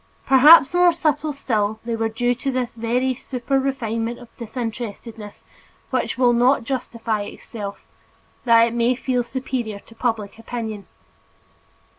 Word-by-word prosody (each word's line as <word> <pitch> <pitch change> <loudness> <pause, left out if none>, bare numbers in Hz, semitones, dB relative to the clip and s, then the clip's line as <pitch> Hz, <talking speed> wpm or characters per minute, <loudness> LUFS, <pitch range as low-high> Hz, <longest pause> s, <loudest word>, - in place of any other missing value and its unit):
Perhaps 270 +2 +7
more 355 0 +5
subtle 310 -2 0
still, 220 -6 -1
they 235 -1 -1
were 225 0 -1
due 245 +2 0
to 260 +3 -3
that 250 -2 -1
very 245 +3 0
super 260 +2 -2
refinement 235 -3 -2
of 240 -1 -15
disinterestedness 225 -2 -7 0.5
which - - -1
will 245 -1 +4
not 245 +2 +3
justify 230 -4 -3
itself, 205 0 -8 0.6
that 230 -2 +6
it 230 - -3
may 240 +1 +2
feel 250 -1 -1
superior 240 -4 -4
to - - -18
public 225 -3 -3
opinion. 220 -4 -6
240 Hz, 135 wpm, -22 LUFS, 225-260 Hz, 0.6 s, Perhaps